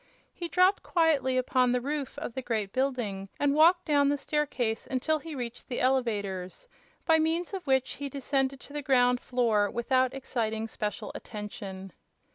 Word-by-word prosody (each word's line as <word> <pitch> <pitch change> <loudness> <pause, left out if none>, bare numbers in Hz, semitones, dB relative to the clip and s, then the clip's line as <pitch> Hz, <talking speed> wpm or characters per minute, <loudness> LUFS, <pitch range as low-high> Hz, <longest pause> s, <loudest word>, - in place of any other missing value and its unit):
He 345 - -4
dropped 365 +3 +3
quietly 290 -7 +2
upon 255 0 +2
the 250 - +2
roof 280 +1 -4
of 285 -5 -5
the 260 - -3
great 220 -5 -2
building 240 -8 -1
and 285 -1 +2
walked 340 +4 +5
down 285 -2 +3
the 290 - +1
staircase 270 -6 -1
until 305 +4 0
he 320 0 -8
reached 240 -2 -6
the 250 - -3
elevators, 215 - -1 0.4
by 320 -1 +5
means 330 +4 0
of 375 -5 -5
which 265 -1 +2
he 285 0 -5
descended 270 0 -1
to 285 - -13
the 295 - -3
ground 250 -2 +3
floor 225 -5 +1
without 255 +2 +1
exciting 225 -4 -2
special 210 -2 -4
attention. 195 -3 -7
260 Hz, 165 wpm, -29 LUFS, 230-290 Hz, 0.4 s, walked